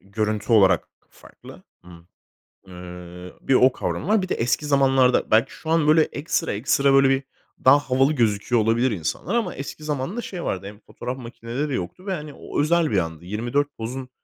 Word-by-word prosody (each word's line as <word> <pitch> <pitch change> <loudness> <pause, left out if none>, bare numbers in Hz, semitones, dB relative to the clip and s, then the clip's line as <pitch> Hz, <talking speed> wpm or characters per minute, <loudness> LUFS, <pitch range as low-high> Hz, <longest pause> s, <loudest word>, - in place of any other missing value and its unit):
görüntü 110 +2 -2
olarak 95 -5 +4 0.2
farklı. - - -15 0.2
Imm, 85 -1 -15 0.6
eee, 90 0 -10
bir 135 - +1
o 130 +1 +6
kavramı - - -4
var. 210 -1 +3
Bir 185 - -5
de - - 0
eski 120 +6 0
zamanlarda 135 -3 +3
belki 110 +1 +3
şu 160 - -9
an 160 -2 +2
böyle 155 +1 +6
ekstra 160 0 -2
ekstra 140 +6 +2
böyle 135 0 +5
bir 135 0 +1 0.4
daha 130 +2 +8
havalı 135 +1 +1
gözüküyor 115 -1 +1
olabilir 115 +3 +2
insanlar 85 - -3
ama 235 - -1
eski 140 +3 -8
zamanda 150 - -3
şey 180 -6 -6
vardı. 95 +1 -3
Hem 105 0 -11
fotoğraf 125 +2 -7
makineleri 125 +3 -5
yoktu 95 - -6
ve, 195 - -2
hani, 150 -3 -6
o - - -3
özel 165 -2 +2
bir 100 - +1
andı. 80 -1 -3
24 120 +8 -1
pozun 125 +3 -6
130 Hz, 180 wpm, -23 LUFS, 105-145 Hz, 0.6 s, daha